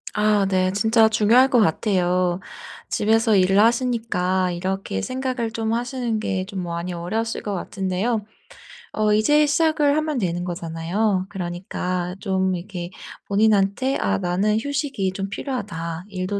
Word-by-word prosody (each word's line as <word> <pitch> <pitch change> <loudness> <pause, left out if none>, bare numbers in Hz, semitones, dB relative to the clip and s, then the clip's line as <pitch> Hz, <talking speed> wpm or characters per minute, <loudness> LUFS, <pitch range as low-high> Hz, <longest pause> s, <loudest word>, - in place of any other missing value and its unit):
아 210 -1 +3
네. 185 -1 +2
진짜 220 +2 +4
중요할 225 +5 +4
것 250 -4 +4
같아요. 180 -2 +1 0.5
집에서 220 0 +2
일을 195 +1 +4
하시니까 225 -6 +1
이렇게 185 - -3
생각을 255 -3 -2
좀 225 0 -2
하시는 240 -2 -2
게 190 -3 -2
좀 190 -3 -5
많이 170 +1 -4
어려우실 220 +7 -3
것 205 - -3
같은데요. 195 +4 -2 0.7
어 215 -1 +2
이제 295 +8 +4
시작을 300 -1 +2
하면 310 -3 -1
되는 175 -4 -1
거잖아요. 175 +4 -1
그러니까 180 -1 -4
좀 190 -2 0
이렇게 175 -1 -6 0.4
본인한테 205 +5 +2
'아 95 -1 +1
나는 195 +5 +1
휴식이 275 -7 -2
좀 195 +1 -4
필요하다. 185 - -5
일도 185 +2 -2
200 Hz, 300 characters per minute, -22 LUFS, 180-225 Hz, 0.7 s, 진짜